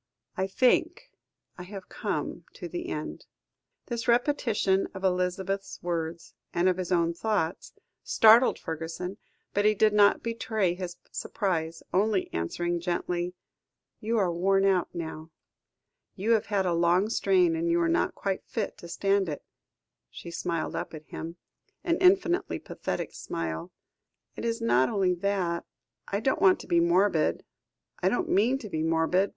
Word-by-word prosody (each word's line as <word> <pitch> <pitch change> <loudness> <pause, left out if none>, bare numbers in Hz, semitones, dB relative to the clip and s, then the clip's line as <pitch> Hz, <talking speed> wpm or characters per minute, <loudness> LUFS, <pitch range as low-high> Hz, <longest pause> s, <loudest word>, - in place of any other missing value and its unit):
"I 190 0 -1
think 255 - +1 0.5
I - - -5
have 195 0 -9
come - - -4
to - - -7
the 350 0 -5
end." - - -5 0.6
This 235 0 -4
repetition 235 -6 +2
of 190 - -7
Elizabeth's 190 +1 -1
words, 170 -1 -3 0.2
and 175 +1 +3
of 185 -1 +2
his 185 -1 -4
own 170 -1 +2
thoughts, 180 -3 -2 0.3
startled 225 +3 +6
Fergusson, 165 +4 -5 0.4
but 205 - +2
he 215 0 +4
did 215 +1 +4
not 205 -1 +5
betray 220 -5 0
his 180 -1 -6
surprise, 165 -5 -2
only 200 0 +1
answering 175 - -1
gently 175 0 -2 0.6
"You 230 +2 -1
are 185 -5 +2
worn 195 +3 +2
out 190 -3 +2
now. 160 -1 -6 0.9
You 210 +4 0
have 220 -2 +3
had 200 -2 +1
a 175 - +1
long 175 +4 +3
strain, 185 -6 +3
and 165 +1 -1
you 170 - +3
were 170 -1 +2
not 165 - +1
quite 195 -1 -2
fit 220 - -3
to 170 - -9
stand 195 +1 +1
it." 145 - -5 0.7
She 170 - -9
smiled 170 -1 -2
up - - -4
at 155 0 -10
him, 165 +3 -7 0.5
an 335 -1 +1
infinitely 370 0 +3
pathetic - - -5
smile. 80 -1 -4 0.6
"It - - -5
is 230 0 -1
not 130 - +3
only 190 -3 +2
that. 180 -2 -1 0.4
I 200 +1 -2
don't 265 +3 +1
want 190 -1 +6
to - - -12
be 170 - +3
morbid. 170 -1 +2 0.5
I - - +2
don't 355 -2 -1
mean 240 +4 +3
to 240 - -8
be 160 -6 -3
morbid. 165 +4 +2
185 Hz, 155 wpm, -28 LUFS, 170-210 Hz, 0.9 s, startled